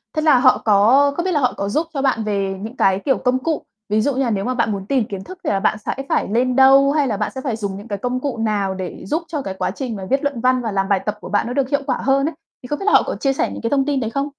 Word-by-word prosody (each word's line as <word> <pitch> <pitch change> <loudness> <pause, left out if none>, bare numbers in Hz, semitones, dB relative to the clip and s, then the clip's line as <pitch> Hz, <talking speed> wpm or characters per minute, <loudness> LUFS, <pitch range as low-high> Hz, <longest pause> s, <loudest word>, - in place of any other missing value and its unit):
Thế 310 - +1
là 310 -4 +5
họ 255 0 +5
có 230 +7 +5
có 345 - 0
biết 370 - -1
là 305 - +2
họ 250 -3 +1
có 200 - -2
giúp 310 +10 0
cho 275 - -2
bạn 260 -5 +1
về 200 -2 -1
những 225 +5 -7
cái, 190 0 +3
kiểu, 270 - +2
công 250 +1 0
cụ, 325 -2 -1 0.3
ví 215 +1 +2
dụ 285 +5 +1
như 270 - +1
là 245 - 0
nếu 200 -3 -1
mà 255 - 0
bạn 235 -3 0
muốn 195 -2 -4
tìm 255 +1 +1
kiến 195 -3 -7
thức 370 - -10
thì - - -1
là 195 - +1
bạn 215 +2 +1
sẽ - - -1 0.2
phải - - +1
lên 245 +4 +1
đâu, 270 +1 +6
hay 290 -2 +1
là 215 -5 -1
bạn 210 0 -2
sẽ 265 - -4
phải 255 -4 -2
dùng 200 -3 -4
những 205 +3 -10
cái 205 -2 -3
công 250 +5 -2
cụ 270 -2 -3
nào 210 -3 0
để 185 -2 -6
giúp 315 +3 -1
cho 305 -3 -3
cái 195 -7 -5
quá 190 - -2
trình 240 +2 -5
mà 195 -2 -6
viết 270 +2 +1
luận 280 -5 -2
văn 255 0 +2
và 225 -2 -3
làm 195 -1 -1
bài 200 -1 +3
tập 210 0 -2
của - - -8
bạn 205 +3 +1
nó 245 - -3
được 270 -1 0
hiệu 285 0 +1
quả 260 -3 0
hơn 275 +1 +2
ấy, 330 - -11 0.3
thì - - -8
không 295 +3 -3
biết 390 - -5
là 415 - +3
họ - - +6
có - - -3
chia 275 -1 0
sẻ - - -1
những - - -7
cái 230 - -1
thông 275 0 +2
tin 285 -2 0
đấy 225 -3 -2
không? 275 +4 -2
250 Hz, 345 wpm, -20 LUFS, 205-275 Hz, 0.3 s, đâu